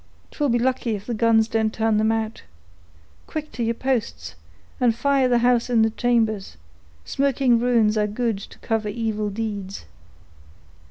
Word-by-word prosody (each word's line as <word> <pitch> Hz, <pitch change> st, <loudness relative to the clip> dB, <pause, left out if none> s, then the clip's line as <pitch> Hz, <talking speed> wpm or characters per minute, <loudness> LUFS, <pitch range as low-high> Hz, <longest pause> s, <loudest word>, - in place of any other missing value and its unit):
'Twill 290 Hz, -2 st, -1 dB
be 240 Hz, -, +3 dB
lucky 245 Hz, -2 st, 0 dB
if 200 Hz, -, -8 dB
the 240 Hz, -, -3 dB
guns 225 Hz, 0 st, +3 dB
don't 220 Hz, -1 st, 0 dB
turn 220 Hz, -1 st, +1 dB
them 220 Hz, +1 st, +2 dB
out. 225 Hz, 0 st, -2 dB, 0.9 s
Quick, 305 Hz, -1 st, -5 dB
to 245 Hz, -, -6 dB
your 230 Hz, 0 st, 0 dB
posts, 215 Hz, -, -2 dB, 0.5 s
and 240 Hz, -3 st, +3 dB
fire 275 Hz, +1 st, +2 dB
the 245 Hz, -1 st, +3 dB
house 245 Hz, -1 st, +2 dB
in 230 Hz, -2 st, +4 dB
the 220 Hz, -, +2 dB
chambers; 220 Hz, -, 0 dB, 0.5 s
smoking 265 Hz, -3 st, +2 dB
ruins 230 Hz, -3 st, +2 dB
are 210 Hz, -1 st, +1 dB
good 220 Hz, -1 st, -2 dB
to -, -, -12 dB
cover 220 Hz, -2 st, -2 dB
evil 215 Hz, -1 st, -2 dB
deeds." 200 Hz, -2 st, -5 dB
225 Hz, 160 wpm, -23 LUFS, 215-245 Hz, 0.9 s, in